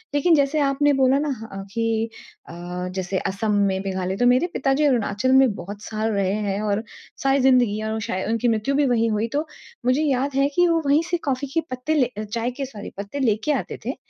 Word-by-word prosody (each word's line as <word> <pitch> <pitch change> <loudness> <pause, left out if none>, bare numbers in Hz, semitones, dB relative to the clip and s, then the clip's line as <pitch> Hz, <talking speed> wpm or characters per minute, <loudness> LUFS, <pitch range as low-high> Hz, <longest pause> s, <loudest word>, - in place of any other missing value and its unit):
लेकिन 320 +3 +4
जैसे 285 +1 +2
आपने 285 +1 +2
बोला 265 0 +3
न 295 -1 -1
ह - - -6
अ, 195 0 -6
कि 225 -1 0 0.4
अ, - - -8 0.4
जैसे 190 0 -2
असम 205 +3 -2 0.2
में 190 0 -1
मेघालय 190 0 -2
तो 245 - +2
मेरे 255 +7 +4
पिताजी 270 +2 +1
अरुणाचल 240 -2 +1
में 265 -4 +5
बहुत 205 +2 -8
साल 220 0 -2
रहे 195 -1 +1
हैं 200 +1 -1
और 210 +1 -1 0.4
सारी 270 0 +3
ज़िंदगी 245 -5 +3
और 220 - -2
वो 220 - -2
शाय 190 +1 -2
उनकी 230 +1 +1
मृत्यु 230 +4 +1
भी 290 0 +3
वहीं 230 -2 +2
हुई। 215 +2 0
तो 300 +2 -1 0.4
मुझे 255 +4 +3
याद 275 -1 0
है 275 0 +3
कि 355 0 +4
वो 330 -1 +2
वहीं 285 +3 +4
से 350 - +1
कॉफ़ी 265 +2 -1
के 330 - +2
पत्ते 255 +5 -1
ले 265 -4 +4
अ, 215 - -2
चाय 230 +3 -3
के 275 - -1
सॉरी 215 -6 -8
पत्ते 200 +8 -5
लेके 225 +2 +1
आते - - -4
थे। - - -2
245 Hz, 225 wpm, -23 LUFS, 210-275 Hz, 0.4 s, में